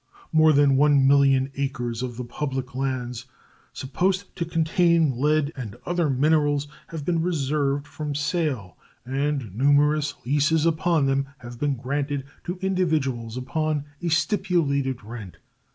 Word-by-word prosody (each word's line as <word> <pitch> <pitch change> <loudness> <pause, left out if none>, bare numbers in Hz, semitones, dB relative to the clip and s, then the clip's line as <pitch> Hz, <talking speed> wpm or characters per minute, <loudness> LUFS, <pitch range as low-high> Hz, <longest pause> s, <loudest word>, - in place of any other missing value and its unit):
More 155 0 +5
than 140 -2 +4
1,000,000 140 -1 +4
acres 120 -4 -2
of 125 -2 -4
the 125 - -4
public 130 +1 -4
lands, 125 -2 -3 0.5
supposed 185 +8 -2
to 170 - -2
contain 170 -1 +2
lead 150 0 +2
and 115 -7 -6
other 175 -3 0
minerals, 145 +1 +2 0.2
have 160 -3 -7
been 170 -1 +1
reserved 145 -4 0
from 150 -1 -5
sale, 145 - -2 0.3
and 135 -4 -2
numerous 145 +3 +3
leases 150 +4 +2
upon 165 -2 +2
them 135 0 +1
have 120 -2 -10
been 145 -1 0
granted 140 +2 -2 0.2
to 180 +1 -4
individuals 150 -11 0
upon 150 +3 -1 0.2
a 175 - -1
stipulated 160 - 0
rent. 105 -7 -9
145 Hz, 130 wpm, -24 LUFS, 130-160 Hz, 0.5 s, More